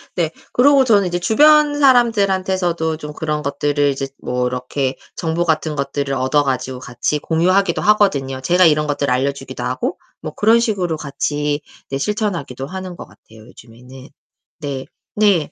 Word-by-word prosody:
네. 165 -3 0 0.2
그리고 275 +1 +5
저는 205 -6 +3
이제 175 0 -1
주변 295 +8 +4
사람들한테서도 190 - +2
좀 150 -1 -8
그런 150 -1 -3
것들을 145 0 0
이제 135 0 -3
뭐 125 0 -1
이렇게 130 +2 -2 0.2
정보 170 0 -1
같은 155 -2 0
것들을 140 0 -2
얻어 135 +3 +1
가지고 130 -1 -3
같이 125 +4 -2
공유하기도 175 +4 +1
하거든요. 145 -11 +2
제가 180 +6 +3
이런 150 -1 +3
것들을 145 -2 -1
알려주기도 140 +2 -2
하고 - - -2 0.2
뭐 155 -1 -6
그런 225 +3 +4
식으로 185 -8 -1
같이 145 +1 -2 0.3
네 135 - -2
실천하기도 170 - -3
하는 185 0 -7
것 - - -9
같아요, 110 +1 -18
요즘에는. 125 +4 -14 0.5
네. 140 -3 -5 0.3
네. 200 -8 +2
155 Hz, 355 characters per minute, -18 LUFS, 140-190 Hz, 0.5 s, 그리고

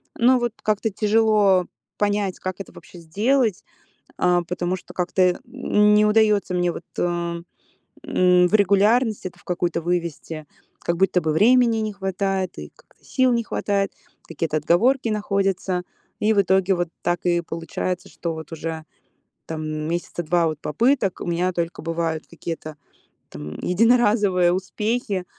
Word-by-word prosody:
Но 250 +2 +4
вот 240 -2 -2
как-то 215 +1 0
тяжело 210 -3 +3 0.3
понять, 205 -2 0
как 185 0 -5
это 195 - -8
вообще 175 - -13
сделать, 215 +6 0 0.6
э, 180 -1 +3
потому 180 +1 -2
что - - -14
как-то 185 +1 -1
н 210 +1 +2
не 210 0 +5
удается 210 -3 +3
мне 175 -1 +1
вот, 170 - -8
э, - - +1 1.0
м, 180 -1 +4
в 215 - -4
регулярность 210 +2 +3
это 175 -1 -8
в - - -22
какую-то 175 -1 -1
вывести. 165 -3 -3 0.3
Как 170 - -1
будто 190 -1 +3
бы 155 -1 -1
времени 230 +5 +4
не 215 -1 -2
хватает, 195 -1 -2
и - - -8
как-то - - -27
сил 255 -2 +2
не 235 -1 +1
хватает, 200 -2 -1 0.4
какие-то 160 -1 -2
отговорки 230 - +2
находятся. 195 -3 -1 0.4
И 215 +1 +4
в 200 - +4
итоге 190 0 +2
вот 175 -1 -1
так 175 -1 0
и 175 -1 +3
получается, 170 +2 -4
что 170 -2 -4
вот 160 +1 -9
уже 160 0 -5 0.6
там 160 -1 -4
месяца 160 +3 -3
2 170 +1 +2
вот 155 -2 -4
попыток. 205 - +1
У - - -4
меня 175 +2 0
только 170 0 -3
бывают 165 -1 -3
какие-то 165 -2 -7 0.6
там 75 +1 -8
единоразовые 205 -4 +3
успехи, 200 +1 -2
185 Hz, 150 wpm, -22 LUFS, 170-210 Hz, 1.0 s, не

